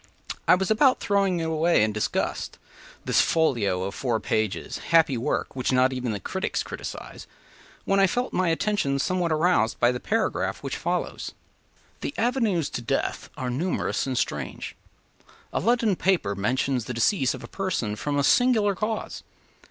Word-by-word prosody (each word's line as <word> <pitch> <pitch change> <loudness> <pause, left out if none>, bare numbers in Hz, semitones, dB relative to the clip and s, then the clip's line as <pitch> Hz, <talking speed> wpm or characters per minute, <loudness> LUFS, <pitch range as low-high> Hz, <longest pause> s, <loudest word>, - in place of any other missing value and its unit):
I - - +7
was 190 +3 -1
about 255 +4 +4
throwing 195 -3 +1
away, 160 -4 +2
in 110 - +1
disgust, 110 - -2 0.5
“This - - +4
folio 115 - +1
of 100 +1 -4
four 120 0 -1
pages, 110 -3 -2
happy 165 -5 +5
work 125 +4 -2
Which 130 0 -1
not 130 +1 +3
even 125 -5 -2
critics 190 +2 -2
criticise,” - - -8 0.6
when 195 0 +2
I 195 - +6
felt 245 +6 -2
my 185 -2 +2
attention 165 -5 0
somewhat 170 +5 0
aroused 155 -8 +2
by 120 0 +4
the 125 - -4
paragraph 225 - -1
which - - -3
follows: - - -3 0.7
“The 280 - -5
avenues 225 - +1
to - - -4
death 115 - -2
are 125 -1 -2
numerous 160 +2 -1
and 130 -2 -2
strange. 145 - -3 0.8
A - - +1
London 230 -4 +2
paper 175 - +1
mentions 125 +4 0
the 125 - -5
decease 135 - +2
of 130 - -10
a - - -7
person 145 - -2
from 145 +6 -2
a 140 - +2
singular 220 - +4
cause. 215 +3 -3
155 Hz, 160 wpm, -25 LUFS, 125-195 Hz, 0.8 s, I